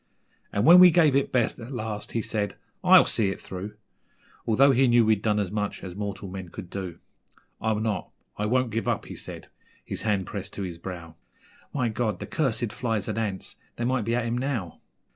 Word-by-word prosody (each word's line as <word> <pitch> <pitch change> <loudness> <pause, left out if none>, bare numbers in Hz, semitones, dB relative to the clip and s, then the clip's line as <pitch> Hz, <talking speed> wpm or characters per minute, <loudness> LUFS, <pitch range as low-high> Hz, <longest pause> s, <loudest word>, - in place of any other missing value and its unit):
And 100 +3 0
when 175 +4 +10
we 180 0 +10
gave 155 -5 +4
it 140 - +1
best 120 -2 +1
at 120 +3 -8
last, 110 -4 -5
he 115 - 0
said, 105 -2 -2 0.3
'I'LL - - +8
see 105 -4 +1
it 95 - -4
through,' 95 +3 -7 0.7
Although 135 +5 +5
he 130 +1 +4
knew 120 -1 +5
we'd 110 -2 +3
done 105 -1 +1
as 100 -3 -1
much 105 -1 -3
as 90 -2 -7
mortal 100 -1 -4
men 95 -1 -7
could 85 - -9
do. 95 -4 -5 0.6
'I'll 110 -1 +1
not 110 -2 -2 0.3
I 105 - -1
won't 130 +1 +1
give 115 +2 -2
up!' - - 0
he - - -8
said, - - -9 0.4
his - - -3
hand 100 -4 0
pressed 100 0 -6
to 100 - -4
his 85 -3 -6
brow; 85 -3 -8 0.5
'My 125 -5 0
God! 110 -3 -1
the - - -5
cursed 120 -7 -1
flies 115 -4 -2
and - - -2
ants, 100 -4 -4 0.2
they 120 - -2
might 125 -3 0
be 115 +1 +1
at 125 -1 0
him 120 +1 -1
now. 120 - -3
110 Hz, 210 wpm, -26 LUFS, 100-120 Hz, 0.7 s, when